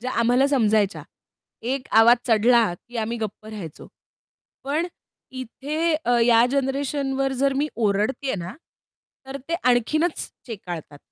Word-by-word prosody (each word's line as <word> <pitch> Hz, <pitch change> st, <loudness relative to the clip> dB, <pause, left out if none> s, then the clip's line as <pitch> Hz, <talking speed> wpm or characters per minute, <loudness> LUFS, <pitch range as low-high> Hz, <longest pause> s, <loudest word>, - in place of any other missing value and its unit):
ज्या 255 Hz, +2 st, -4 dB
आम्हाला 245 Hz, +4 st, +3 dB
समजायच्या. 215 Hz, -7 st, +2 dB, 0.6 s
एक 255 Hz, +2 st, -2 dB
आवाज 235 Hz, +2 st, +7 dB
चढला, 230 Hz, -2 st, +4 dB, 0.2 s
की 240 Hz, -, -8 dB
आम्ही 225 Hz, +2 st, -2 dB
गप्प 215 Hz, -1 st, -6 dB
राहायचो. 200 Hz, -8 st, -8 dB, 0.8 s
पण 305 Hz, +5 st, 0 dB, 0.5 s
इथे 295 Hz, +6 st, -2 dB
अ, 245 Hz, 0 st, +3 dB
या 230 Hz, 0 st, +5 dB
जनरेशनवर 270 Hz, 0 st, -1 dB
जर 275 Hz, +1 st, +1 dB
मी 295 Hz, +2 st, 0 dB
ओरडतेय 220 Hz, +5 st, 0 dB
ना, 175 Hz, +4 st, -6 dB, 0.7 s
तर 270 Hz, -, -6 dB
ते 335 Hz, -, 0 dB
आणखीनच 305 Hz, +7 st, +1 dB, 0.2 s
चेकाळतात. 175 Hz, -, -7 dB
245 Hz, 125 wpm, -23 LUFS, 220-275 Hz, 0.8 s, आवाज